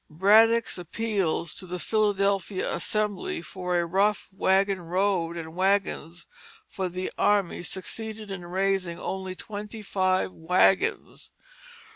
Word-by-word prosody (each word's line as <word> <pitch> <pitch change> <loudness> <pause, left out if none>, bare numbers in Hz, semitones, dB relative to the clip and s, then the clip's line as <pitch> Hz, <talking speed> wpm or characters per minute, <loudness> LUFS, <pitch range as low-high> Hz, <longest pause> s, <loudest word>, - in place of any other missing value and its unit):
Braddock's 220 +6 +4
appeals 180 -3 -1
to 185 - -7
the 180 +1 -4
Philadelphia 200 -1 0
Assembly 210 +2 -1
for 180 -1 -2
a 170 - 0
rough 195 +4 +1
wagon 195 0 +2
road 175 -1 0
and 160 -1 -7
wagons 185 -3 0 0.4
for 190 -1 -4
the 185 +1 -4
army 200 -5 +2
succeeded 215 +4 -5
in 195 -2 -5
raising 190 -1 0
only 190 -1 -4
twenty 210 +2 -7
five 185 -2 +1
wagons. 180 +3 +1
190 Hz, 115 wpm, -26 LUFS, 180-205 Hz, 0.4 s, Braddock's